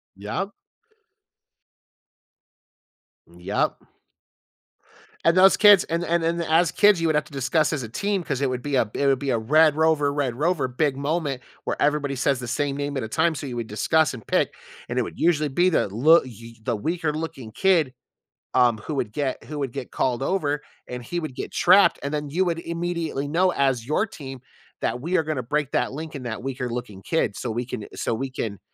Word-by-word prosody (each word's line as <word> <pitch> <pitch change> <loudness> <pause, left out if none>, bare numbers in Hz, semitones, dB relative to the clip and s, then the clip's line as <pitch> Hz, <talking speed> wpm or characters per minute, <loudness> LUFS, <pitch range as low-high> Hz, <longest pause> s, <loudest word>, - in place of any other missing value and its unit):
Yep. 110 - -4 2.8
Mm, - - -17
yep. - - 0 1.5
And 165 - +5
those 190 +1 +6
kids 205 -3 +7
and 170 +1 -2
the 170 - -5
and 170 -1 +2
and 170 +1 0
the 165 - -3
as 165 +1 +4
kids, 205 -4 +4
you 165 - +2
would 155 - +2
have 150 - +2
to 150 - -17
discuss 140 +5 +1
as 140 -5 -2
a 110 - -7
team 200 - -1
‘cause 140 -4 -3
it 140 - +1
would 125 -1 -3
be 145 0 -2
a 115 -5 +2
it 140 - 0
would 135 -2 +3
be 140 -1 -1
a 115 - +2
red 150 +7 +4
rover, 155 -2 +2
red 140 -5 -1
rover 150 -1 +1
big 135 +2 0
moment 145 -2 -2 0.2
where - - -3
everybody 145 -1 +1
says 135 0 +1
the 125 - -6
same 140 +3 -1
name 145 0 -3
at 130 - -2
a - - -4
time, 165 +9 +1
so 145 - -5
you 125 - -5
would 115 -2 -4
discuss 155 +9 +2
and 120 -4 -9
pick - - +1 0.4
and 125 +1 -1
it - - +3
would - - -8
usually 155 -3 +2
be 175 +7 +3
the 155 - +1
l 155 +11 +6
y 115 -2 -11
the 120 +1 0
weaker 155 +6 -2
looking 155 -7 -6
kid, 165 - +2 0.6
um, 120 -3 +4
who 150 +8 -5
would 115 -6 -2
get 140 0 -2
who 150 -1 -6
would 135 -4 -2
get 135 -2 -7
called 130 0 0
over 150 -4 0 0.3
and 125 0 -6
he 175 +8 -3
would 155 -6 -6
get - - -5
trapped 185 +3 +5
and 140 +2 -3
then 150 -1 -2
you 180 +6 +1
would 170 -2 -1
immediately 170 -4 -3
know 180 +5 +2
as 135 -6 +1
your 155 - +1
team 135 -8 -9 0.4
that 125 - -1
we 175 +6 0
are - - +2
gonna 155 -5 -3
break 145 +2 -1
that - - 0
link 155 +1 -6
in 135 - -6
that 115 -3 -5
weaker 130 -2 -3
looking 115 -5 -6
kid 140 -11 0
so 120 - -3
we 120 +2 -2
can 110 -4 -6
so - - -1
we 135 +4 -3
can 105 -6 -4
145 Hz, 215 wpm, -24 LUFS, 125-165 Hz, 2.8 s, kids